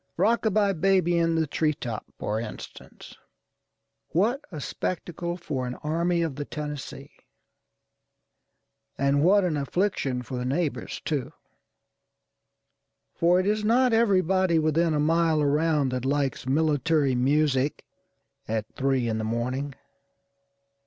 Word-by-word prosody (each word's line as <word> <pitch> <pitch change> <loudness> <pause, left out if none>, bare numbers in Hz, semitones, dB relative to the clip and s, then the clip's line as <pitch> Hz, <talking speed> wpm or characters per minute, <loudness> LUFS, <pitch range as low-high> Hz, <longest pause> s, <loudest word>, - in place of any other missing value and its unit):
â€"Rock 225 +7 +2
a - - +4
by 205 -1 +2
Baby 180 0 +2
in 165 0 +2
the 160 -1 +2
Tree 155 +1 0
top, 115 -6 -6
for 105 +1 -2
instance. 115 -2 -9 0.9
What 230 - +1
a 155 - -6
spectacle 175 +3 -4
for 140 -7 -4
an 125 - -4
Army 170 +3 0
of 150 -5 -3
the 145 - -2
Tennessee! 150 -2 -7 1.9
And 140 +1 +2
what 200 +3 +5
an 170 -4 0
affliction 140 -4 -1
for 125 +2 -6
the - - -3
neighbors, 145 +4 -2
too; 145 -5 -2 1.8
for 175 +2 +3
it 185 - 0
is 210 +1 +1
not 245 +3 +3
everybody 190 -5 +3
within 160 +1 +2
a - - +1
mile 160 +1 +2
around 150 -1 +2
that 125 -1 -3
likes 135 -1 -1
military 150 0 +2
music 140 +2 +1 0.6
at 110 -1 -1
three 135 -3 +1
in 110 -1 -1
the - - -2
morning. 125 +5 -2
155 Hz, 130 wpm, -26 LUFS, 135-175 Hz, 1.9 s, what